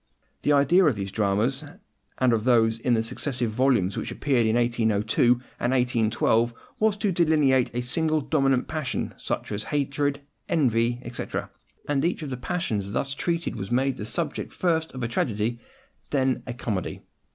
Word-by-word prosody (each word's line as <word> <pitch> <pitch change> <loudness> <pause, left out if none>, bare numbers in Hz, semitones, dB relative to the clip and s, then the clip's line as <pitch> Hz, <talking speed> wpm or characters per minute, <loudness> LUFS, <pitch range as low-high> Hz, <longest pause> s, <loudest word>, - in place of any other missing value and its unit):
The 150 - +2
idea 145 +6 +5
of 145 -6 +3
these 100 -1 -4
dramas, 110 +7 0 0.5
and 130 -2 +3
of 110 -2 +1
those 115 -2 +3
in 120 +1 +2
the 110 - +1
successive 125 0 -2
volumes 115 -6 +2
which - - -4
appeared 120 -2 +1
in 110 - +2
1802 120 -1 +2 0.3
and 120 +2 +1
1812, 120 -2 +2 0.2
was 215 -1 +2
to 205 -1 0
delineate 150 -7 +3
a 125 - 0
single 155 +5 +1
dominant 135 -3 +1
passion, 155 -4 -3
such - - -4
as 105 +1 -3
hatred, 145 0 -1 0.3
envy, 120 -6 +2
etc.; 120 0 -5 0.4
and 140 -2 +1
each 170 -1 0
of 145 - -5
the 130 - -3
passions 110 - -2
thus 135 +3 -1
treated 170 +3 -2
was 95 - -5
made 130 +2 +1
the 105 - -5
subject - - -3
first 160 -3 0
of 130 -2 -5
a - - 0
tragedy, 115 - -1 0.5
then 130 -2 +1
of - - -14
a 125 - -3
comedy. 105 -7 -3
125 Hz, 170 wpm, -25 LUFS, 115-145 Hz, 0.5 s, idea